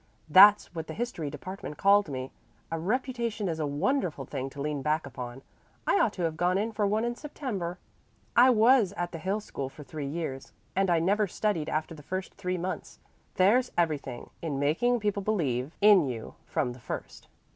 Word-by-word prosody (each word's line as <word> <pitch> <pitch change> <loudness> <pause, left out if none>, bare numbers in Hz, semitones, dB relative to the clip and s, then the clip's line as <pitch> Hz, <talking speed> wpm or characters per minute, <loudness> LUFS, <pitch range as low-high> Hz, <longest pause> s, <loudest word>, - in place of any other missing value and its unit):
That's 200 +5 +7
what 160 -2 -5
the 160 - -6
history 220 -10 -3
department 150 +1 -7
called 200 -2 +4
me. 130 -1 -5 0.4
A 165 - -1
reputation 235 +1 -1
is 160 -2 -2
a 150 - 0
wonderful 160 - -1
thing 135 -1 -4
to 140 - -12
lean 145 0 -2
back 155 +2 0
upon. 125 -1 -7 0.4
I 200 - +3
ought 210 - +2
to 180 - -4
have 165 -1 0
gone 180 +2 +2
in 215 +3 -1
for 210 -2 0
one 215 +3 +1
in 240 - -1
September. 240 - -5 0.6
I 250 +2 +8
was 230 -3 +5
at 175 0 -2
the 165 - -6
Hill 195 +5 -1
School 135 -9 -5
for 150 +2 -12
three 145 0 -6
years, 140 -6 -5 0.2
and 195 -1 +2
I 170 - +4
never 200 +5 +2
studied 175 -4 -1
after 155 +2 -2
the 155 - -11
first 185 +5 -5
three 185 -2 -3
months. 180 -1 -5 0.4
There's 230 +7 +4
everything 150 -7 -1
in 155 -4 -2
making 220 - +2
people 205 -1 0
believe 150 - -1
in 200 -7 +7
you 115 -3 -5
from 125 - -1
the 125 - -13
first." - - -7
175 Hz, 190 wpm, -28 LUFS, 150-210 Hz, 0.6 s, I